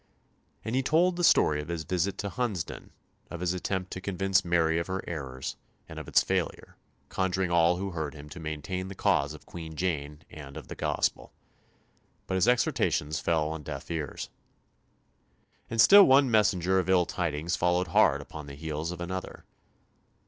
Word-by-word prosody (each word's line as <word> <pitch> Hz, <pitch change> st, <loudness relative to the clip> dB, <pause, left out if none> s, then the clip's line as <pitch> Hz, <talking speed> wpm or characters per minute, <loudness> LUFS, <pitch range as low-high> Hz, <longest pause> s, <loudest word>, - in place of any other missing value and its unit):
And 110 Hz, -, -3 dB
he 130 Hz, -, +3 dB
told 170 Hz, +6 st, +2 dB
the 175 Hz, -, -2 dB
story 75 Hz, -, +4 dB
of 75 Hz, -, -9 dB
his 85 Hz, -2 st, -3 dB
visit 90 Hz, +3 st, -1 dB
to 100 Hz, -, -3 dB
Hunsdon, 110 Hz, -, -3 dB, 0.4 s
of 85 Hz, -, -7 dB
his 90 Hz, 0 st, 0 dB
attempt 95 Hz, 0 st, -3 dB
to 95 Hz, -, -5 dB
convince 95 Hz, 0 st, +1 dB
Mary 85 Hz, -2 st, +2 dB
of 85 Hz, -, -4 dB
her 95 Hz, 0 st, -3 dB
errors, 70 Hz, -2 st, -5 dB, 0.3 s
and -, -, -8 dB
of -, -, -9 dB
its -, -, +4 dB
failure, -, -, -2 dB, 0.3 s
conjuring 95 Hz, -1 st, -1 dB
all 85 Hz, +1 st, +4 dB
who 95 Hz, +1 st, -3 dB
heard 80 Hz, -3 st, -4 dB
him 75 Hz, 0 st, -10 dB
to 80 Hz, -, -9 dB
maintain 80 Hz, +4 st, -4 dB
the 95 Hz, -, -8 dB
cause 70 Hz, -2 st, +1 dB
of 80 Hz, -, -15 dB
Queen 80 Hz, -2 st, -8 dB
Jane 75 Hz, -3 st, -3 dB
and 70 Hz, -1 st, -10 dB
of 80 Hz, -, -10 dB
the -, -, -6 dB
Gospel. -, -, -1 dB, 0.9 s
But -, -, -4 dB
his 95 Hz, -1 st, +2 dB
exhortations 80 Hz, -10 st, +1 dB
fell 80 Hz, -2 st, 0 dB
on 80 Hz, -1 st, -5 dB
deaf 75 Hz, +1 st, -7 dB
ears. 75 Hz, -4 st, -4 dB, 1.4 s
And 115 Hz, -, -4 dB
still 200 Hz, -, +9 dB
one 135 Hz, -1 st, +5 dB
messenger 95 Hz, -4 st, +3 dB
of 95 Hz, 0 st, -2 dB
ill 90 Hz, -2 st, +4 dB
tidings 85 Hz, 0 st, -2 dB
followed 90 Hz, +1 st, +1 dB
hard 70 Hz, -3 st, +4 dB
upon 75 Hz, 0 st, -9 dB
the 70 Hz, -, -8 dB
heels 80 Hz, +2 st, -4 dB
of 90 Hz, -1 st, -7 dB
another. 95 Hz, +1 st, -6 dB
85 Hz, 180 wpm, -28 LUFS, 75-95 Hz, 1.4 s, still